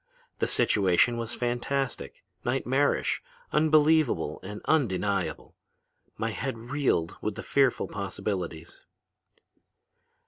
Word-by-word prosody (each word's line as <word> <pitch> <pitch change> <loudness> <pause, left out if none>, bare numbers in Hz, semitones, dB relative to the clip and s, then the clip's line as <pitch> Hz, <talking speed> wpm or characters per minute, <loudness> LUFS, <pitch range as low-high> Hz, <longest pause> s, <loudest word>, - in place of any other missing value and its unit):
The - - +1
situation 100 +4 +3
was 115 0 -4
fantastic, 125 +2 -2 0.2
nightmarish, 135 +3 +1 0.3
unbelievable 155 - +3
and 105 +3 -7
undeniable. 100 - 0 0.6
My 115 0 -1
head 120 +4 -3
reeled 120 - 0
with 105 - -2
the - - -6
fearful 135 -3 +2
possibilities. 95 -4 -4
115 Hz, 90 wpm, -28 LUFS, 100-135 Hz, 0.6 s, situation